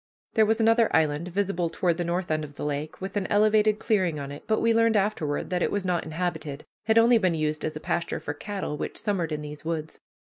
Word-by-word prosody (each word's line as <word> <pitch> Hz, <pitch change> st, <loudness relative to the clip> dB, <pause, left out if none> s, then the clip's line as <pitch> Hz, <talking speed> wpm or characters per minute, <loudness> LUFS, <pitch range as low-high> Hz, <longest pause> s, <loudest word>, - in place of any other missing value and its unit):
There 220 Hz, -1 st, +4 dB
was 220 Hz, +1 st, +2 dB
another 225 Hz, 0 st, +4 dB
island 155 Hz, +1 st, +1 dB
visible 180 Hz, -2 st, -1 dB
toward 170 Hz, 0 st, 0 dB
the 175 Hz, -, -1 dB
north 175 Hz, +1 st, -2 dB
end 155 Hz, 0 st, 0 dB
of 145 Hz, -1 st, -9 dB
the -, -, -5 dB
lake, 150 Hz, +1 st, -3 dB
with 190 Hz, +1 st, -6 dB
an 195 Hz, -, -1 dB
elevated 215 Hz, 0 st, +4 dB
clearing 185 Hz, -9 st, +1 dB
on 140 Hz, 0 st, -6 dB
it; 145 Hz, -, -9 dB
but 220 Hz, -, +2 dB
we 230 Hz, 0 st, +3 dB
learned 230 Hz, -1 st, +4 dB
afterward 195 Hz, -9 st, -1 dB
that 180 Hz, -1 st, 0 dB
it -, -, +2 dB
was 200 Hz, -2 st, -2 dB
not 175 Hz, -2 st, 0 dB
inhabited, 160 Hz, -3 st, -4 dB, 0.2 s
had 220 Hz, 0 st, +3 dB
only 230 Hz, +1 st, +6 dB
been 185 Hz, -5 st, +2 dB
used 155 Hz, -1 st, -1 dB
as 155 Hz, -, -2 dB
a -, -, -4 dB
pasture 170 Hz, +2 st, -2 dB
for -, -, -4 dB
cattle 200 Hz, -7 st, -4 dB
which -, -, -5 dB
summered 185 Hz, -6 st, -1 dB
in 150 Hz, 0 st, -3 dB
these 150 Hz, -1 st, -8 dB
woods. 160 Hz, -1 st, -4 dB
180 Hz, 240 wpm, -26 LUFS, 155-210 Hz, 0.2 s, only